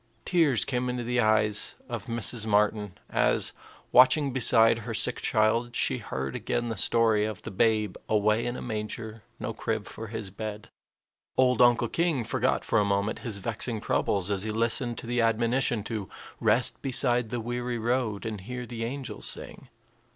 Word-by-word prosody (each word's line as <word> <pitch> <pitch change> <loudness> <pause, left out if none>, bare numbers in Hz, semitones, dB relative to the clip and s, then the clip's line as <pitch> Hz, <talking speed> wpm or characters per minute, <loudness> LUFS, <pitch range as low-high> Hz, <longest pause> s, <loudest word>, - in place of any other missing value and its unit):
Tears 160 - +3
came 125 -1 -1
into 125 -1 -3
the 125 +1 0
eyes 110 -2 +2
of 120 -5 -5
Mrs. 115 -1 -1
Martin 105 -1 +1
as, 60 +1 +1 0.4
watching 135 +2 +5
beside 115 -2 +4
her 115 0 -5
sick 125 +2 +2
child, 115 +2 +1
she - - +1
heard 65 0 -4
again 120 0 -2
the 115 - -3
story 110 +1 +2
of 110 -3 -4
the - - -6
Babe 105 0 +1
"away 110 +2 +2
in 120 - -3
a - - -6
manger, 110 -1 -5 0.2
no - - -4
crib 110 -2 -3
for 115 - -8
his 110 -3 -5
bed." 105 +1 -6 0.7
Old 125 -2 +4
Uncle 120 -1 +5
King 165 -3 0
forgot 125 +2 0
for - - +2
a - - +3
moment 100 +1 0
his 115 -5 -3
vexing 110 +3 -3
troubles 100 -2 0
as 100 -2 0
he 110 - -1
listened 115 +2 0
to - - -7
the 120 +1 0
admonition 115 0 +1
to 105 -5 -5 0.3
"rest 115 +1 +2
beside 125 -3 +2
the 120 +1 -3
weary 120 +1 -3
road 115 -2 -1
and 110 -3 -4
hear 125 +5 -6
the 115 -1 -5
angels 130 +2 -5
sing." 135 - -6
115 Hz, 175 wpm, -27 LUFS, 105-120 Hz, 0.7 s, watching